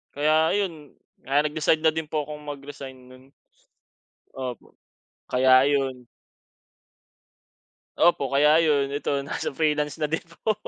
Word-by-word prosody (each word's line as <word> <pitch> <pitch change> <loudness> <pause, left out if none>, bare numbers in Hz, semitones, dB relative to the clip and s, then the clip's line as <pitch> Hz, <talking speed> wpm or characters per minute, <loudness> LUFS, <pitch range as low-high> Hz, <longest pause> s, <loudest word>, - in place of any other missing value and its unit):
kaya 155 +3 +2
ayun 165 -8 -4 0.2
kaya 140 +2 +1
nag-decide 155 +1 0
na 160 - +5
din 160 0 -4
po 155 -1 -2
akong 150 +1 -8
mag-resign 140 -2 -8
no'n. 130 0 -17 1.1
Opo, 125 -3 -7 0.6
kaya 130 +1 +5
ayun. 135 -3 -1 1.9
Opo 170 -3 +3
kaya 145 +2 +5
ayun, 140 -3 +1
ito 145 - -3 0.2
nasa - - -3
freelance 150 0 -1
na 155 - -1
din 160 - 0 0.2
po. 220 - +3
145 Hz, 125 wpm, -25 LUFS, 135-155 Hz, 1.9 s, na